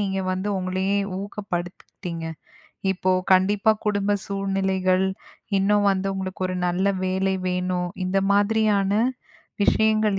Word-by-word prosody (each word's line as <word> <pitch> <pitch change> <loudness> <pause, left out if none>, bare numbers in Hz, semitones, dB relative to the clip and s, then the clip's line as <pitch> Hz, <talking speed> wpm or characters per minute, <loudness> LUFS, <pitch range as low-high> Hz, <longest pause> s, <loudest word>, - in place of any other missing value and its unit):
நீங்க 195 -1 -1
வந்து 185 +2 -2
உங்களையே 185 +2 0 0.2
ஊக்கப்படுத்திக்கிட்டீங்க? 180 -3 -5 0.7
இப்போ 185 0 -1 0.2
கண்டிப்பா 200 +3 +4
குடும்ப 205 -1 +1
சூழ்நிலைகள், 190 -1 +1 0.5
இன்னும் 205 +1 +3
வந்து 195 0 0
உங்களுக்கு 190 0 -4
ஒரு 185 - -2
நல்ல 180 +3 +1 0.2
வேலை 190 +1 +1
வேணும், 180 0 -1 0.2
இந்த 190 +1 +1
மாதிரியான 205 -1 +2 0.7
விஷயங்கள் 215 -2 +3
195 Hz, 105 wpm, -24 LUFS, 185-200 Hz, 0.7 s, கண்டிப்பா